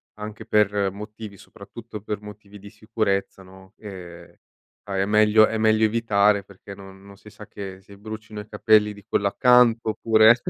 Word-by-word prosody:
anche 105 +1 -9
per 105 -3 +1
motivi 105 0 -10
soprattutto 105 +3 -12
per 105 -1 -5
motivi 105 0 -13
di 100 +1 -12
sicurezza, 105 -3 -3
no, 95 +1 -17
ehm, 90 -5 -11 0.6
a 95 - -3
è 95 - +1
meglio 105 +1 +4
è 110 - -3
meglio 110 0 +3
evitare 105 -2 +2
perché 100 0 -13
non 95 -1 -14
non 100 - -14
si 105 +2 -16
sa, 105 0 -14
che 95 -2 -9
si 100 +1 -16
brucino 110 0 -9
i 105 - -14
capelli 105 0 +3
di 105 -1 -14
quello 100 - 0
accanto 120 0 +3
oppure, 110 +1 +5
105 Hz, 170 wpm, -23 LUFS, 100-110 Hz, 0.6 s, oppure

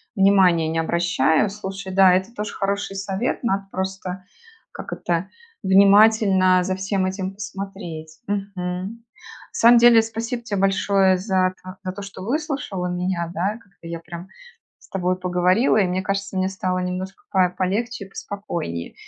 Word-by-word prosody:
внимания 190 -5 +4
не 165 - -1
обращаю. 170 +1 +2
Слушай, 195 -1 -6
да, 190 -1 +6
это 190 +5 0
тоже 210 -1 -5
хороший 200 0 -2
совет, 195 +6 -2
надо 195 -3 -1
просто, 190 -1 -4 0.5
как - - -7
это, 175 +2 -2 0.3
внимательно 195 -1 +5
за 185 +1 -1
всем 190 0 -1
этим 190 0 -3
посмотреть. 195 -6 -7
Мгм. 195 +1 -4 0.4
На - - -10
самом 235 +1 +7
деле, 235 -1 +7
спасибо 230 +2 -4
те 215 -3 -3
большое 195 -1 +3
за 185 -1 +1
та 185 +1 -10
за 185 - -3
то, 200 - -8
что 195 -1 -9
выслушала 265 - -2
меня, 180 -1 -2
да, 185 +5 0
как-то 185 -4 -16
я 170 0 -5
прям 170 +2 -9 0.5
с - - -20
тобой 185 -1 -1
поговорила, 185 +6 +2
и 195 -4 +3
мне 185 +1 -1
кажется, 195 0 -3
мне 185 0 +1
стало 185 -1 -2
немножко 185 +1 -5
по 185 -2 +3
полегче 200 +5 -2
и 195 - -16
поспокойнее. 170 - -5
190 Hz, 155 wpm, -22 LUFS, 180-200 Hz, 0.5 s, самом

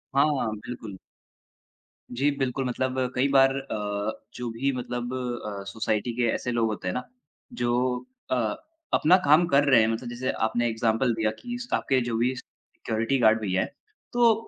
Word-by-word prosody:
हाँ, 140 -5 +2
बिल्कुल। 115 -5 -7 1.2
जी 140 +2 +3
बिल्कुल। 135 0 -1
मतलब 130 +1 -1 0.2
कई 130 +2 +3
बार 135 0 +6
अ, 105 -5 -3 0.2
जो 125 -1 -4
भी 135 +5 0
मतलब 120 0 -4
अ, 120 -6 -4
सोसाइटी 110 +1 -1
के 120 - +2
ऐसे 125 - -2
लोग 115 -2 +2
होते 105 -4 -4
हैं 90 - 0
ना, 125 - -2 0.5
जो 125 - 0 0.3
अ, 130 - +3 0.6
अपना 180 +5 +6
काम 155 +4 +6
कर 140 -3 +4
रहे 125 -4 +7
हैं, 110 - +3
मतलब 115 +2 -2
जैसे 125 +2 -2
आपने 120 +2 0
इग्ज़ैम्पल 115 +2 +1
दिया 110 -1 +1
कि 240 0 -5
स्टाफ़ 240 - -1
जो 120 -2 -2
भी 125 +3 +2
सिक्युरिटी 115 +1 -3
गार्ड 110 -1 +5
भैया 95 -3 +1
हैं, - - -2 0.4
तो 240 -2 +5
120 Hz, 165 wpm, -26 LUFS, 110-135 Hz, 1.2 s, रहे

